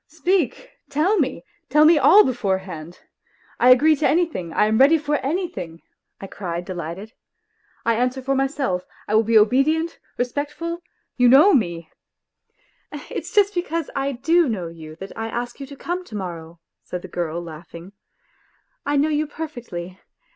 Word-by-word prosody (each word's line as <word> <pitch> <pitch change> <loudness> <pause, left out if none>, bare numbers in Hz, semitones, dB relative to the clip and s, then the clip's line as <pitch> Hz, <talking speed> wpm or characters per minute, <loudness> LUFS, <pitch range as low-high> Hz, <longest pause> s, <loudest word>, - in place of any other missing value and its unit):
Speak, 345 0 -1 0.2
tell 360 +8 +2
me, 260 - -1 0.3
tell 300 +1 +5
me 315 -1 +6
all 415 +8 +7
beforehand; 190 -8 -3 0.6
I 245 - +5
agree 300 +5 +6
to 285 - +2
anything, 305 - 0
I 210 - +2
am 220 +1 +1
ready 285 +5 +6
for 295 -1 -1
anything," 280 - -4 0.4
I - - -7
cried 180 -3 -5
delighted. 185 +5 -6 0.4
" - - -38
I 230 - +3
answer 250 +2 0
for 270 +1 0
myself, 270 -8 -1 0.2
I - - -2
will 220 - +6
be 225 0 +3
obedient, 275 +10 +2 0.2
respectful... 295 +7 -3 0.4
you 245 -1 +5
know 305 +11 +7
me... 170 - 0 0.4
." - - -53 0.2
" - - -43 0.2
It's - - -5
just 410 -1 +3
because 335 -3 -3
I 275 0 -1
do 325 +5 +2
know 185 -7 -3
you 160 -2 -11
that 195 +4 -10
I 225 0 -4
ask 240 +3 -5
you 275 - -7
to 280 - -10
come 350 +6 -4
to 220 - -10
morrow," 170 -4 -7 0.2
said 180 -1 -7
the - - -7
girl, 170 -2 -3
laughing. 170 +2 -10 0.5
" - - -41
I 290 0 +1
know 295 +3 +2
you 305 0 0
perfectly. 240 - -7
250 Hz, 170 wpm, -22 LUFS, 185-310 Hz, 0.6 s, all